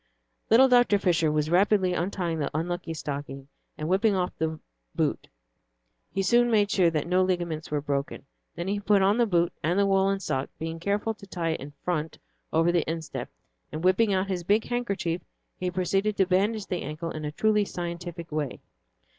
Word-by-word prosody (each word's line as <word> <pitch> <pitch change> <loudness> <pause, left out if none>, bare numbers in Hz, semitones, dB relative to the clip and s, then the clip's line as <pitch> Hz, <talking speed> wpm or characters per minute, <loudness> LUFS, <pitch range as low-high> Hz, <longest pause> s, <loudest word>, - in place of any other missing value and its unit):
Little 255 +4 +7
Dr. 245 -5 +5
Fisher 170 -5 +2
was 150 +1 0
rapidly 190 0 +3
untying 175 -2 -2
the 145 - -1
unlucky 175 0 -3
stocking; 140 -2 -6 0.3
and, 155 - -3
whipping 195 +4 +3
off 180 -1 -1
the 160 0 -2 0.4
boot, - - -1 0.8
he 195 - -1
soon 240 +5 +4
made 210 -3 +3
sure 180 -3 +4
that 155 -3 -1
no 180 +2 +2
ligaments 175 -4 -1
were 150 -1 -1
broken. 140 -1 -3 0.3
Then 170 - -4
he 200 +1 0
put 205 -1 +3
on 200 +4 +3
the 235 - +4
boot 175 -3 +2
and 175 +4 +1
the 200 - +4
woollen 195 0 +2
sock, 135 -8 -2
being 165 +1 -5
careful 205 +5 -1
to 205 -2 -14
tie 170 -3 -2
it 160 - -1
in 145 +2 -8
front 160 -3 -2 0.3
over 165 +2 +3
the 175 -2 +2
instep, 165 -1 -4 0.4
and 155 +2 -5
whipping 195 +4 +4
out 190 0 +1
his 185 -3 -2
big 205 +5 +2
handkerchief 200 -8 -2 0.4
he 180 - -1
proceeded 195 +3 0
to 190 - +4
bandage 200 +3 +1
the 180 -3 -3
ankle 155 +3 -5
in 155 - -6
a 150 - -3
truly 210 +5 +2
scientific 170 -2 -6
way. 150 -3 -3
180 Hz, 190 wpm, -27 LUFS, 160-200 Hz, 0.8 s, Little